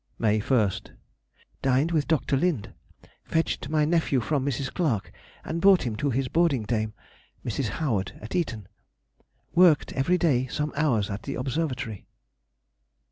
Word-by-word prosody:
May 110 -1 +2
1st.—Dined 130 - -2
with 155 -3 +1
Dr. 155 -3 +1
Lind. 140 - 0 0.5
Fetched 165 0 -1
my 155 -1 +2
nephew 160 -4 +2
from 140 +3 -1
Mrs. 135 -1 -2
Clark 110 - -1 0.3
and 165 +1 -3
brought 195 -1 +6
him 115 -3 -2
to 140 +5 0
his 135 +1 0
boarding 160 -6 +2
dame, 110 0 -2 0.5
Mrs. - - -1
Howard, 115 -12 -1
at 110 - -7
Eton. 115 - -2 0.9
Worked 175 -2 +5
every 160 +7 +2
day 130 -7 +2
some 150 +2 -3
hours 125 -10 +1
at 100 - -4
the 140 - -5
Observatory. 130 - -3
135 Hz, 135 wpm, -26 LUFS, 115-160 Hz, 0.9 s, brought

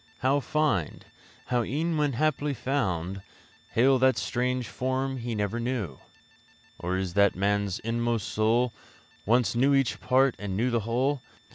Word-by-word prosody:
How 135 +2 +3
find? 145 - -1 0.4
How 125 -1 +1
e'en 160 +7 -1
when 150 -2 +1
haply 150 +1 0
found 95 -9 -2 0.5
Hail 130 +3 +4
that 130 0 +4
strange 125 0 -1
form 130 +1 -2
he 120 -2 -4
never 105 +2 -1
knew? 115 - -3 0.8
Or 90 +2 -1
is 95 -2 -2
it - - -16
that 100 -1 +5
man's 100 0 0
inmost 115 -1 -1
soul 115 +3 +1 0.5
Once 115 -2 +3
knew 135 +4 +3
each 135 -3 +1
part 130 0 +3
and 100 -2 -4
knew 125 +4 +1
the 120 - +2
whole? 130 +3 +1
120 Hz, 150 wpm, -27 LUFS, 105-135 Hz, 0.8 s, that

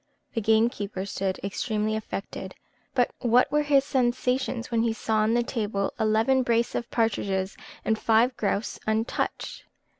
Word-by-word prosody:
The 225 - -1
gamekeeper 220 -3 +1
stood 195 -1 -2
extremely 215 +2 -1
affected; 215 -2 -5 0.4
but 245 -2 +3
what 245 +2 +3
were 300 +1 +3
his 285 -2 +4
sensations, 255 -2 0
when 230 -1 +2
he 230 -1 +1
saw 220 0 -1
on 215 +2 +3
the 240 - +3
table 205 -5 -2
eleven 220 +5 +3
brace 235 -1 +1
of 235 - -3
partridges, 200 -4 0 0.3
and 220 0 +1
five 230 +3 +3
grouse 205 0 -1
untouched! 220 +2 -2
225 Hz, 145 wpm, -26 LUFS, 215-245 Hz, 0.4 s, his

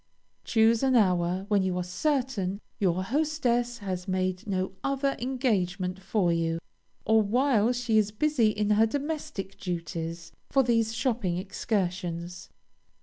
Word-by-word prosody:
Choose 225 0 +3
an 265 -1 +3
hour 185 -3 +2
when 205 -2 +3
you 185 -1 -1
are 180 - -1
certain 205 - -1 0.2
your 185 -2 +1
hostess 245 -2 0
has 185 -3 -4
made 185 0 -1
no 190 -1 -1
other 275 0 0
engagement 195 -8 -1
for 190 -3 +1
you, 165 0 0 0.5
or 220 0 +5
while 235 +1 +2
she 240 -3 +2
is 210 -1 +1
busy 245 +2 +2
in 210 0 0
her 220 +2 +5
domestic 285 - -4
duties, 170 -1 -4 0.2
for 270 - +4
these 230 -2 +1
shopping 225 -8 0
excursions. 180 -3 -3
210 Hz, 135 wpm, -28 LUFS, 185-245 Hz, 0.5 s, or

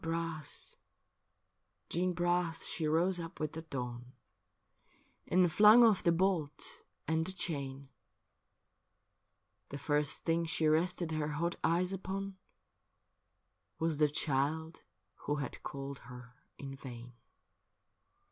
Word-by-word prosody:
Jeanne 165 - -3
Bras, 165 -3 -4 1.1
Jeanne 180 +2 0
Bras, 175 -1 0
she 160 -2 -2
rose 175 +4 +2
up 165 -1 -7
with 155 -1 -1
the 160 - -5
dawn. 125 -4 -6 1.1
And 180 -1 +4
flung 215 +6 +8
off 215 -5 +5
the 170 - +4
bolt 170 -4 -1 0.3
and 160 0 +2
the 185 - -2
chain: 140 -7 -3 1.8
The 140 - -5
first 145 0 0
thing 165 0 +1
she 160 0 0
rested 170 +2 +1
her 155 -1 -1
hot 170 +4 -1
eyes 180 +3 +2
upon 195 +1 -4 1.4
Was 160 -2 0
the 150 -1 +5
child 150 +3 -1 0.5
who 145 - +2
had 145 -2 -5
called 140 0 -6
her 125 -1 -11 0.2
in 135 -1 -7
vain. 125 -3 -9
160 Hz, 120 wpm, -33 LUFS, 145-175 Hz, 1.8 s, flung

